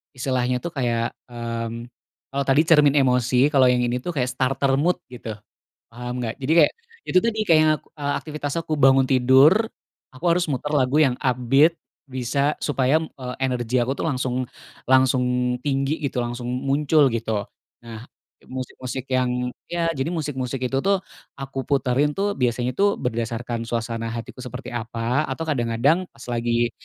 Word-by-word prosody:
istilahnya 125 -1 0
tuh 170 - -4
kayak, 120 -4 -1 0.2
mmm, 115 0 -5 0.4
kalau 140 0 -1
tadi 135 +3 +5
cermin 150 -3 +5
emosi, 125 +1 +3
kalau 130 -3 +5
yang 125 0 +3
ini 120 +1 0
tuh 170 +5 -5
kayak 125 -2 0
starter 135 +1 0
mood 175 +4 +2 0.2
gitu, 115 -3 -7 0.6
paham 125 +1 -5
gak? 115 +4 -4
Jadi 135 +3 -2
kayak - - +3 0.4
itu 185 - +2
tuh 230 +4 +1
nih 215 - 0
kayak, 155 -1 +4 0.2
eee, 145 0 -1
aktivitas 150 -2 -5
aku 160 -3 -2
bangun 135 0 +6
tidur, 135 - +5 0.5
aku 135 +7 -15
harus 175 0 +1
muter 145 +1 -2
lagu 145 +2 +3
yang 125 -3 +1
upbeat 135 +5 +3 0.3
bisa 135 +3 -1
supaya, 135 0 +2
eee, 130 -5 -7
energi 125 -2 -1
aku 130 - -2
tuh - - -1
langsung 130 -2 -1 0.4
langsung 130 -1 +4 0.4
tinggi 140 +2 -1
gitu, 125 -4 -2
langsung 120 0 -5
muncul 140 +2 +2
gitu. 110 -3 -2 0.4
Nah 115 +1 -9 0.4
musik-musik 130 0 -6
yang 125 -1 0 0.2
ya, 170 -1 0
jadi 140 -2 -3
musik-musik 130 -4 -3
itu 135 +2 -1
tuh 195 +3 +1 0.3
aku 135 -1 -6
puterin 140 +1 +1
tuh 205 +1 0
biasanya 125 0 +1
tuh 200 +9 +2
berdasarkan 115 -1 -3
suasana 115 0 -3
hatiku 115 +2 -7
seperti 125 0 -7
apa, 120 +4 -2
atau 135 +5 -4
kadang-kadang 140 +5 +1
pas 115 - -16
lagi 120 0 0
130 Hz, 155 wpm, -23 LUFS, 120-145 Hz, 0.6 s, bangun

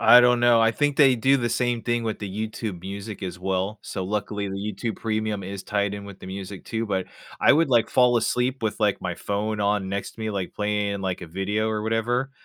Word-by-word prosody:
I 120 - +9
don't 125 0 +4
know, 120 -1 +5
I 115 - +5
think 145 +3 +1
they 135 -3 +6
do 135 +4 +4
the 120 -2 0
same 120 0 0
thing 120 -1 0
with 110 -1 -2
the 105 +2 -3
YouTube 105 -5 -5
Music 100 +3 -7
as 90 -1 -5
well. 95 +3 -1
So 95 - -4
luckily, 105 0 -2
the 95 - -5
YouTube 105 +3 -3
Pemium 110 -3 -2
is 100 0 -6
tied 100 -1 -1
in 100 0 -7
with 100 -1 -10
the - - -10
music 95 0 -7
too. 115 0 -2
But, 95 -2 -1 0.3
I - - +7
would, 160 +2 +3
like, 120 -3 +3
fall 125 -1 +5
asleep 125 +2 0
with, 110 +1 -2
like, 105 -2 +2
my 90 - -3
phone 105 +4 -2
on 100 -1 +1
next 100 +1 -3
to - - -14
me, 110 0 -2
like, 95 -3 -4
playing, 105 -1 -1
like, 95 -2 -2
a - - -7
video 100 +6 -1
or 110 -1 -1
whatever. 120 +4 0
105 Hz, 235 wpm, -25 LUFS, 100-115 Hz, 0.3 s, I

